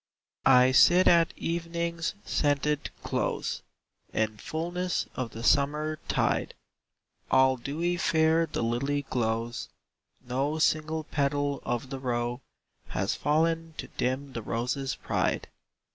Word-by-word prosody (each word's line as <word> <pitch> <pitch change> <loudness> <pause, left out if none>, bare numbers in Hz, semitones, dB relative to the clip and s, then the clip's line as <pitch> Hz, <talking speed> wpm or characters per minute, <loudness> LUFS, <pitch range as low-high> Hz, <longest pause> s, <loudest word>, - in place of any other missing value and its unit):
I. 125 -1 +7
I 130 - +4
sit 175 +8 +6
at 170 -1 +5
evening's 170 +1 -2
scented 145 0 0
close, - - -2 0.5
In 110 -1 -1
fulness 175 +6 -2
of 130 -2 -3
the 115 +1 -8
summer 150 +3 +2
tide; - - 0 0.7
All 130 0 +5
dewy 165 +8 -2
fair 160 0 +3
the - - -3
lily 140 +5 0
glows, 115 0 -1 0.5
No 135 +5 -2
single 155 0 +1
petal 145 -1 -1
of 120 +2 -3
the 135 - -4
row; 120 -1 -2 0.5
Has 95 +1 -1
fallen 165 +1 0
to - - -6
dim 130 +2 -2
the 115 - -4
rose's 125 +5 -2
pride. - - -1
145 Hz, 120 wpm, -28 LUFS, 125-160 Hz, 0.7 s, I